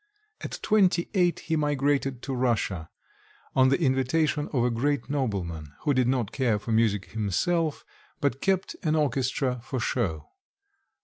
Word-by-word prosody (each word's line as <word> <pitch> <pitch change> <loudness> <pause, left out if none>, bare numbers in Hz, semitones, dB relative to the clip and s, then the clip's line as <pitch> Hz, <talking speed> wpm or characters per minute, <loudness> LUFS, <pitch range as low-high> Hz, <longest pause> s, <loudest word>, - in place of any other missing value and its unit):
At - - -4
twenty 190 -5 +3
eight 180 -3 +2
he 160 - -1
migrated 145 -2 +1
into 130 +2 -6
Russia, 115 -10 0 0.7
on 130 0 +5
the 135 - +2
invitation 145 +1 +1
of 125 -5 +1
a 125 - +2
great 140 +5 -1
nobleman, 90 - -2
who 145 - +1
did 125 -2 +2
not 125 -5 0
care 120 -6 +1
for 110 +2 -6
music 110 -3 +1
himself, 150 - 0 0.3
but 140 -2 0
kept 195 -1 0
an 155 -3 +1
orchestra 130 -3 0
for 130 0 -3
show. 90 -11 -2
130 Hz, 145 wpm, -27 LUFS, 115-150 Hz, 0.7 s, on